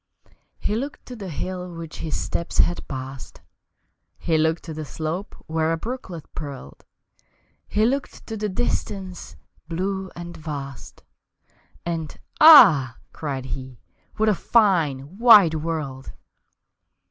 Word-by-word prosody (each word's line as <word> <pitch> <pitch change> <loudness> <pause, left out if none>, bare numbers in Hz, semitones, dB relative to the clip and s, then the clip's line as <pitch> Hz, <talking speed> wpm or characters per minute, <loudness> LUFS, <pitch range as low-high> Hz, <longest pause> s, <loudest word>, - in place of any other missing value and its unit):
He 210 - -2
looked 275 +5 -5
to 250 - -8
the 200 -5 -7
hill 180 +2 -5
which 165 -2 -8
his 155 -2 -3
steps 170 - -3
had 175 - +2
passed, 130 -1 -7 0.8
He 165 - 0
looked 160 +1 +1
to 160 - -7
the 155 0 -5
slope 160 +6 -5
where 160 0 0
a 165 - 0
brooklet 185 - -6
purled, 140 -4 -8 0.8
He 215 +1 +2
looked 270 +3 -2
to 225 - -5
the 210 0 -2
distance 190 -3 -3 0.3
blue 190 +3 -3
and 175 0 -8
vast 140 -4 -8 0.8
And 165 -3 -4 0.2
"Ah," 155 - +9 0.2
cried 135 -4 -4
he, 130 -1 -7 0.4
"what 220 - +2
a 215 - +5
fine, 175 - +1
wide 215 -9 +8
world!" 150 -4 -4
165 Hz, 125 wpm, -23 LUFS, 150-200 Hz, 0.8 s, Ah